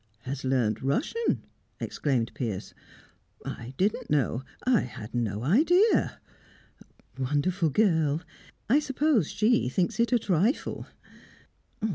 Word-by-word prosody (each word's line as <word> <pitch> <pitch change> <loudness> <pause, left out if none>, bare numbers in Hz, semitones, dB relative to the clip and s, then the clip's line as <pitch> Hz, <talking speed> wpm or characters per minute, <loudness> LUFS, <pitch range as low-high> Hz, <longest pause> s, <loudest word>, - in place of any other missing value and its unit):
"Has 135 +2 -5
learnt 125 -5 +1
Russian?" 280 - 0 0.4
exclaimed 125 -6 -1
Piers. 110 -7 -4 0.7
"I 120 +3 -7
didn't 200 +3 0
know 135 -4 +1 0.2
I 255 -3 +4
had 110 -2 -7
no 110 -3 -1
idea 340 - +3 0.5
" - - -23
"Wonderful 155 +6 +1
girl! 160 -4 +2 0.4
I 270 +7 +5
suppose 275 - +1
she 210 - +2
thinks 175 - -1
it 235 +1 +2
a 245 - +5
trifle." 205 - 0
160 Hz, 110 wpm, -27 LUFS, -, 0.7 s, I